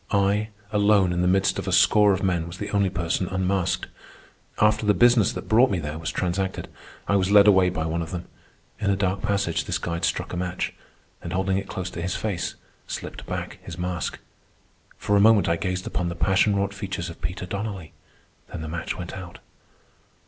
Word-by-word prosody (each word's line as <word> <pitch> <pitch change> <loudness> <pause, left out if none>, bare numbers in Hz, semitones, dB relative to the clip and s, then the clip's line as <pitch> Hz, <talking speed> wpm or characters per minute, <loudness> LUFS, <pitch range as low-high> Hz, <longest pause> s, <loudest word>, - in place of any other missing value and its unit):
I, 100 +2 +1 0.2
alone 100 -3 +3
in 90 - 0
the 90 - +2
midst 95 +1 +2
of - - -6
a - - 0
score 105 -1 +5
of 95 0 0
men, 85 -3 0
was 85 +1 -8
the 105 +1 -5
only 100 -2 +2
person 90 0 -1
unmasked. 95 0 0 0.7
After 105 +1 +3
the 105 -1 +3
business 120 -4 +5
that - - -7
brought 120 +4 +5
me 95 - 0
there 75 -1 -4
was 80 - -3
transacted, 95 +1 -2 0.4
I 100 - +2
was 95 -1 +2
led 100 0 +7
away 95 -3 +5
by 80 -3 -3
one 80 +1 -1
of 80 - -5
them. 90 -1 -5 0.5
In 100 -2 0
a 100 - +3
dark 95 0 -1
passage 90 -5 0
this - - -1
guide 85 0 -4
struck 85 +2 -1
a - - -3
match, 90 0 -2 0.5
and, - - -6
holding 95 0 +1
it 100 - -8
close 90 -1 -4
to 85 - -6
his 90 +2 -2
face, 100 -5 -3 0.3
slipped - - -6
back - - -5
his 85 - -9
mask. 90 -3 -3 0.8
For 105 - 0
a - - +5
moment 110 -1 +5
I 85 - +2
gazed 90 +1 -3
upon 90 -1 -2
the 85 - -5
passion 95 +3 +3
wrought 100 0 0
features 100 -4 -4
of 85 - -14
Peter 90 +4 -4
Donnelly. 100 -3 -5 0.6
Then - - -5
the 80 - -5
match 80 +1 -4
went 90 -1 -6
out. 90 -3 -9
95 Hz, 205 wpm, -25 LUFS, 85-100 Hz, 0.8 s, led